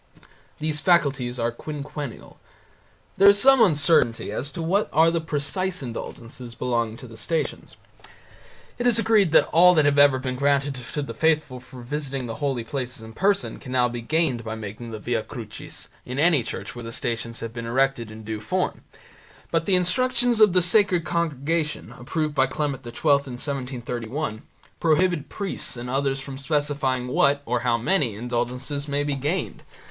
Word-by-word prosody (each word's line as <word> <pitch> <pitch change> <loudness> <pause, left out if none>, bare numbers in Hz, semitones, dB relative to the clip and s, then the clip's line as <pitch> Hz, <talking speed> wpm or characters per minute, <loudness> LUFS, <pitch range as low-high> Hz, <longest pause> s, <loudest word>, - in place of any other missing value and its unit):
These 155 -1 -1
faculties 140 -7 +2
are 120 0 0
quinquennial. 145 0 -7 0.8
There 200 +1 +8
is 200 0 +5
some 270 +2 +6
uncertainty 150 - +3
as 125 +6 -3
to 165 - -5
what 195 +6 +1
are 165 +2 +5
the 170 -1 0
precise 160 +3 -1
indulgences 120 0 -7
belonging 115 -2 -1
to 125 - -10
the 115 - -12
stations. 160 +8 -3 1.0
It 245 - +1
is 235 -2 +3
agreed 220 -6 +3
that - - +6
all 180 +2 +6
that 155 -2 +4
have 145 0 +3
ever 145 -2 +6
been 130 -1 -3
granted 140 +1 +2 0.2
to 150 - -1
the - - -6
faithful 155 -5 +1
for 125 0 -12
visiting 135 0 -4
the 115 -1 -5
holy 135 -5 -1
places 125 -1 -5
in 110 0 -10
person 200 - 0
can 125 - -9
now 125 -1 +3
be 120 0 -5
gained 135 -2 0
by 110 0 -4
making 110 +2 -7
the 110 - -6
Via 115 +1 -1
Crucis 110 -3 -9 0.2
in 125 +1 -6
any 155 -2 +4
church 115 - -6
where 120 - -7
the 115 - -6
Stations 115 0 -3
have 115 -1 -5
been 115 -1 -5
erected 130 -2 +1
in 110 0 -10
due 110 0 -4
form, 105 - -2 0.7
but 165 -1 0
the 195 - +4
Instructions 235 +5 +2
of 210 -4 +7
the 180 -1 +4
Sacred 180 -2 +3
Congregation, 160 -4 -1
approved 150 +5 -3
by 135 -2 +3
Clement 140 -1 -3
XII 120 - -7
in 140 -4 +2
1731, 125 -2 -4 0.4
prohibit 165 -1 +2
priests 195 - -3
and 125 +1 -5
others 135 0 0
from 135 0 -7
specifying 140 -3 0
what 140 +3 +2
or 125 - 0
how 120 -1 +1
many 125 - +1
indulgences 125 +5 -2
may 145 0 0
be 145 0 -1
gained. 150 +6 -2
140 Hz, 175 wpm, -24 LUFS, 120-160 Hz, 1.0 s, There